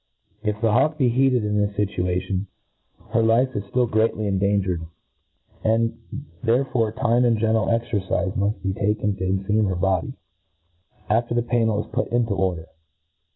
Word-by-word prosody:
If 105 -1 -2
the 115 -1 +2
hawk 145 +7 +2
be 130 -5 +3
heated 130 -1 +2
in 105 0 0
this 100 0 -1
fitua^ 90 -3 0
tion, 95 +1 -3 0.6
her 115 0 +3
life 120 +4 +2
is 100 - -2
ftill 120 +4 +1
greatly 110 -1 +1
endangered 100 -3 0
j 80 - -8 0.8
and 115 +1 +1 0.4
Aerrforc 120 -2 +1
tmc 120 -1 +2
and 120 -2 +3
gentle 110 0 +1
cxercifc 110 -4 -1
muft 100 -2 -1
be 95 -1 -1
ta^? 105 +3 0
ken 105 -1 0
to 95 - -4
cnfisam 100 +3 +1
.her 95 - -1
l^ody, 95 +7 0 0.9
after 120 +2 +1
the 120 - +1
pannel 115 -3 0
is - - -20
put 125 +4 -1
into 120 -3 0
order. 90 -4 -1
110 Hz, 165 wpm, -23 LUFS, 100-115 Hz, 0.9 s, be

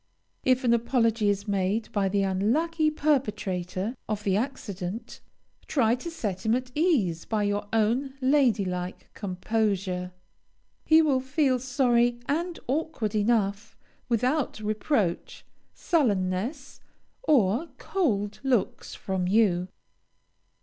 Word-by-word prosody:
If 255 +1 +3
an 235 -2 +4
apology 230 -2 +2
is 200 +1 -1
made 200 +2 -1
by 195 -2 +1
the 200 0 +1
unlucky 300 - +1
perpetrator 210 - -1
of 210 -1 -2
the 195 -2 +1
accident, 215 -3 -4 0.5
try 230 -6 +2
to 255 +7 -4
set 200 - -4
him 220 +1 +2
at 255 0 -3
his - - -24
ease 245 - +1
by 215 -2 0
your 205 0 -1
own 235 +5 +1
lady 260 -6 +3
like 180 0 -5
composure. 190 -2 -1 0.7
He 320 0 +6
will 280 -4 +2
feel 265 0 +1
sorry 245 -2 +2
and 335 +4 -1
awkward 270 -6 -2
enough, 210 -2 0 0.3
without 250 +3 0
reproach, 215 - -1 0.3
sullenness, 235 - -1 0.4
or 260 - +2
cold 210 - -1
looks 255 -7 0
from 190 -2 -2
you. 185 -3 +3
225 Hz, 115 wpm, -27 LUFS, 200-265 Hz, 0.7 s, He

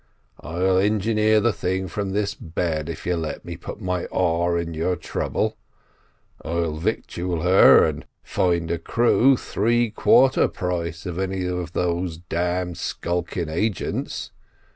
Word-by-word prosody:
I'll 90 +3 +1
engineer 110 +1 +2
the 120 0 +2
thing 95 +1 -2
from 100 +3 -3
this 100 +1 -1
bed 80 -1 -3
if 80 - -7
you'll 90 -1 0
let 80 -1 -5
me 85 - -6
put 85 - -8
my 90 -3 -2
oar 85 -1 +1
in 85 -1 -3
your 85 +3 0
trouble; - - -2 0.9
I'll 85 -2 -1
victual 85 +1 -2
her, 90 +2 +7
and - - -4 0.2
find 85 -2 0
a 85 - -1
crew 120 +7 +3
three 120 +2 0
quarter 130 +4 +4
price 85 -2 -4
of 90 -1 -4
any 95 -1 -2
of 90 -2 -3
those 85 -1 -1
d 85 - -18
d 90 +1 -1
skulking 85 0 -3
agents. 95 +4 -2
90 Hz, 140 wpm, -23 LUFS, 85-95 Hz, 0.9 s, her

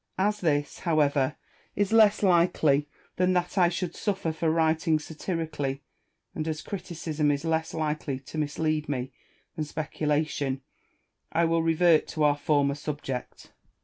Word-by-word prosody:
245 205 +2 +1 0.2
this, - - -15
however, 145 -4 +2 0.4
is 205 +1 0
less 215 -2 +5
likely 160 -5 +3 0.3
than 185 0 +3
that 180 -1 0
I 180 -3 +5
should 180 0 -3
suffer 195 -6 -1
for 160 +1 -1
writing 160 0 +2
satirically, 150 -3 -4 0.5
and 155 - -3
jas 155 -1 -3
criticism 165 -5 -2
is 145 +2 0
less 160 0 0
likely 150 -3 -2
to 155 +3 -6
mislead 155 0 -1
me 130 -2 -2 0.4
than 155 - -2
speculation, 150 -3 -2 0.7
I 170 +1 +2
will 165 0 +2
revert 165 0 +4
to 155 - -2
our 145 -1 +4
former 145 -1 +1
suDJect. 145 -3 -6
155 Hz, 140 wpm, -27 LUFS, 145-170 Hz, 0.7 s, less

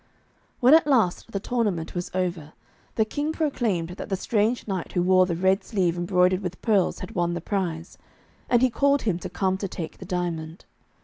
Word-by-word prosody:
When 250 +4 +7
at 320 -1 +6
last 230 -6 +1
the 200 - -2
tournament 205 -7 -1
was 175 0 -4
over, 175 -5 -2 0.4
the 220 - +2
King 290 +7 -2
proclaimed 240 - -1
that 180 - -7
the 195 - 0
strange 220 +5 0
knight 190 -4 -4
who 175 - +1
wore 185 0 +4
the 170 - -1
red 190 +3 +2
sleeve 185 -5 0
embroidered 180 +1 +2
with 180 -2 -5
pearls 205 -5 +2
had 185 - -6
won 175 -1 0
the - - -2
prize, 170 -3 -3 0.5
and 240 0 +4
he 255 - +4
called 280 +3 +2
him 185 -6 0
to 185 - -6
come 190 +1 0
to 195 - -2
take 165 -3 -7
the 185 - -8
diamond. 170 -3 -4
185 Hz, 195 wpm, -25 LUFS, 175-220 Hz, 0.5 s, When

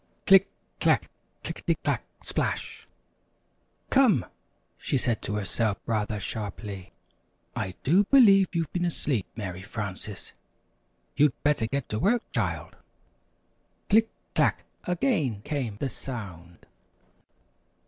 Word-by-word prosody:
"Click, 195 -1 +7 0.3
clack! - - +2 0.3
Click - - -5
ety - - +1
clack! - - 0 0.2
Splash!" - - -2 1.0
"Come," 245 - +5 0.5
she 140 - 0
said 120 -3 +1
to 105 - -3
herself, 105 +1 0
rather 105 -2 -1
sharply, 100 -2 -5 0.6
"I 95 0 -3
do 185 +8 +4
believe 200 -8 +6
you've 165 -2 -1
been 175 -1 0
asleep, 140 - -1
Mary 95 -5 -5
Frances! 100 -1 -5 0.8
You'd 145 -2 +4
better 145 -6 +2
get 140 +1 -2
to 105 - -2
work, 230 - +2
child." - - -2 1.1
"Click! 220 +2 +5 0.2
Clack!" - - +2 0.2
Again 170 - 0
came 130 -8 -3
the 140 - -1
sound. 95 -11 -7
120 Hz, 110 wpm, -27 LUFS, -, 1.1 s, Click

